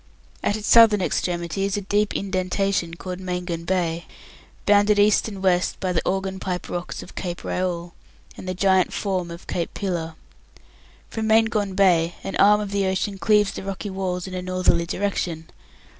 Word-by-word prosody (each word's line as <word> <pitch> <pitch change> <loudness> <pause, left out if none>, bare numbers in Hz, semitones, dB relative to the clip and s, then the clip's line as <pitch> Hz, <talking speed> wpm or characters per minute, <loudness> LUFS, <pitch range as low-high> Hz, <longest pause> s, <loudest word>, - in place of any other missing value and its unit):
At 205 - 0
its 215 - -6
southern 225 -3 +7
extremity 175 0 -1
is 200 0 0
a - - -2
deep 205 +2 0
indentation 185 -2 -1
called 180 +1 -6
Maingon 180 -2 -4
Bay, 170 -2 0 0.6
bounded 205 0 +4
east 205 +2 +4
and 195 -3 -7
west 180 -1 +2
by 185 -2 -1
the 165 - +1
organ 190 0 -2
pipe 180 -2 -4
rocks 175 0 -5
of - - -13
Cape 175 -2 -5
Raoul, 175 -2 -2 0.4
and - - -9
the 185 - -2
giant 190 0 +3
form 185 -4 -2
of 170 0 -9
Cape 170 - -3
Pillar. 170 -5 -3 1.0
From 220 -1 -2
Maingon 220 -3 +2
Bay 175 -4 +3
an 195 - -4
arm 210 +1 +6
of 205 -1 -5
the 200 -1 +1
ocean 190 +1 -1
cleaves 210 -1 +3
the - - -6
rocky 195 +1 -5
walls 185 -2 -3
in 190 - -7
a 185 - -3
northerly 180 -2 +1
direction. 175 -4 -2
190 Hz, 175 wpm, -23 LUFS, 180-200 Hz, 1.0 s, southern